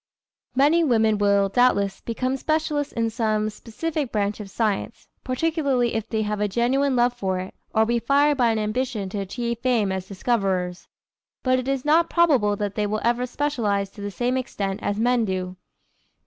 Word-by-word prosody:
Many 300 +6 +4
women 220 -6 +2
will, 200 -1 +3
doubtless, 200 -2 +2
become 255 +3 -2
specialists 305 0 -1
in 230 -1 -1
some 215 -2 0
specific 280 +6 -4
branch 205 0 -1
of 205 -2 -7
science, 220 +2 -2 0.2
particularly 270 -3 0
if 220 -1 -3
they 220 -1 0
have 210 0 -2
a 210 - +2
genuine 255 +6 +1
love 245 0 +3
for 190 -6 -2
it, 185 +1 -6 0.2
or 220 0 +4
be 235 +1 +1
fired 285 +5 +3
by 245 -4 +3
an 225 - +1
ambition 215 -1 -2
to 205 - -4
achieve 235 +4 -3
fame 235 -6 +1
as 190 -1 -4
discoverers. 190 -4 -1 0.6
But 255 0 +3
it 255 - -5
is 275 -1 -1
not 320 +3 +4
probable 270 -12 +3
that 205 -1 -3
they 210 0 -1
will 215 +1 -2
ever 240 +1 +1
specialize 225 -8 -1
to 205 - -11
the 205 - -3
same 245 +5 -1
extent 200 -6 -3
as 205 +1 -2
men 240 +1 +2
do. 185 -2 -3
230 Hz, 180 wpm, -24 LUFS, 205-255 Hz, 0.6 s, Many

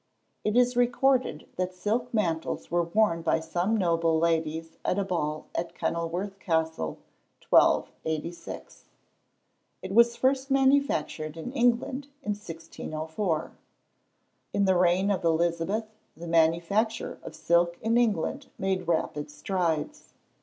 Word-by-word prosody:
It 215 +2 +1
is 250 0 +4
recorded 245 - +2
that 185 0 -2
silk 225 +6 -1
mantles 170 -10 -1
were 175 0 +3
worn 170 -2 +2
by 165 - +2
some 175 +7 0
noble 165 -4 +2
ladies 160 0 -1
at 185 - 0
a 200 - +1
ball 155 -5 -2
at 170 0 -3
Kenilworth 175 +4 -2
Castle, 160 - -1 0.5
1286. 160 +2 0 1.0
It 190 +1 -5
was 235 +2 +5
first 265 +1 +1
manufactured 265 - +1
in 165 +10 -5
England 245 +2 +1 0.2
in 210 - -1
1604. 165 -2 -4 1.0
In 200 0 +2
the 190 -1 +3
reign 180 +3 +3
of 190 - -1
Elizabeth, 170 +6 +1 0.3
the 170 - -8
manufacture 170 +7 +1
of - - -9
silk 170 0 +2
in 225 +1 0
England 240 - +1
made 190 -2 -1
rapid 150 -3 -1
strides. 165 -2 -2
175 Hz, 120 wpm, -27 LUFS, 165-220 Hz, 1.0 s, was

